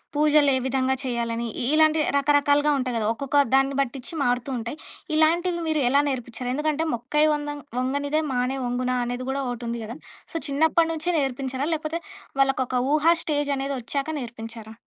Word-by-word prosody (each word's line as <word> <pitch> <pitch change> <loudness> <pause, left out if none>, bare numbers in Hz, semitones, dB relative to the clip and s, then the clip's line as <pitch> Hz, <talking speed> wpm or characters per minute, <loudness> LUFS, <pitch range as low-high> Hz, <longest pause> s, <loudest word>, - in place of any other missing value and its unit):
పూజలు 295 -1 +4
ఏ - - +2
విధంగా 265 0 +1
చేయాలని 235 -1 -2 0.2
ఇలాంటి 310 +3 +4 0.2
రకరకాలుగా 290 +1 +3
ఉంటాయి 255 -2 -2
కదా! 220 - -1
ఒక్కొక్క 275 +4 -1 0.2
దాన్ని 270 0 +3
బట్టించి 265 +2 -4
మారుతూ 245 +1 0
ఉంటాయి. 235 +6 -5 0.4
ఇలాంటివి 340 +2 +2
మీరు 310 -2 +1
ఎలా 280 +2 +4
నేర్పించారు? 250 -1 -4
ఎందుకంటే, 305 +1 0
మొక్కై 270 +6 +1
వంగ 295 0 -3 0.3
వంగనిదే 285 +4 0
మానై 250 +2 0
వంగునా! 250 +1 -1
అనేది 245 +1 -3
కూడా 275 - -1
ఒకటి 240 0 -5
ఉంది 235 0 -3
కదా! 230 +5 -7 0.4
సో, 330 - -1
చిన్నప్పటి 320 +3 +2
నుంచే 320 +2 -3
నేర్పించారా? 270 0 -2
లేకపోతే 315 +1 -2 0.4
వాళ్ళకి 270 -1 +2
ఒక 255 - -3 0.2
ఊహా 310 +2 +5
స్టేజ్ 290 -2 0
అనేదొచ్చాక 275 +1 -3
నేర్పించారా? 225 -2 -8
275 Hz, 155 wpm, -25 LUFS, 245-300 Hz, 0.4 s, ఊహా